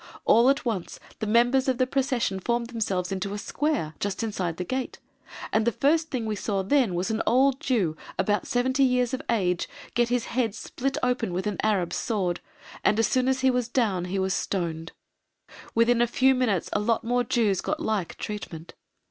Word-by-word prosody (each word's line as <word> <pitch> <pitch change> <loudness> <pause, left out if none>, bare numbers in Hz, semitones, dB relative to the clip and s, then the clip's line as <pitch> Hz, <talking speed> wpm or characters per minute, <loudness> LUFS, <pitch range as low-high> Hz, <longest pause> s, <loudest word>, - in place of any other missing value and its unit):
All 235 +3 +6
at 275 +1 +1
once 210 -7 -3 0.2
the 215 - -2
members 245 +4 +3
of 260 -2 +1
the 255 - +3
procession 255 -7 0
formed 235 +4 -1
themselves 195 -5 -1
into 195 +1 -3
a - - -3
square, 285 - -1
just 200 +2 -2
inside 185 -6 -2
the 180 - -2
gate, 255 +7 -3 0.6
and 220 - +3
the 235 - +2
first 315 +7 +2
thing 250 -6 -2
we 215 -1 -1
saw 200 -1 -1
then 230 -3 +2
was 180 +5 -1
an 220 - 0
old 265 +3 +4
Jew, 200 - 0 0.2
about 205 -2 0
70 260 +2 +1
years 250 -2 +3
of 260 - -2
age, 185 -6 +1 0.2
get 240 -1 +2
his 245 -1 0
head 230 -4 0
split 270 +4 -3
open 245 -6 0
with 185 +3 -2
an 210 -2 -2
Arab's 200 -5 0
sword, 190 -6 -1 0.4
and 210 - +3
as 225 - +3
soon 255 +4 +1
as 265 0 +1
he 265 0 +4
was 250 -2 0
down 215 -8 0
he 185 +2 -3
was 190 0 0
stoned; 165 -4 -2 0.8
within 230 +1 +4
a 240 - +4
few 260 +3 +3
minutes 235 -9 0
a - - +2
lot 225 +3 +1
more 245 +2 +1
Jews 225 -6 +1
got 310 - -2
like 215 - -2
treatment. 175 -6 -6
230 Hz, 200 wpm, -26 LUFS, 195-255 Hz, 0.8 s, All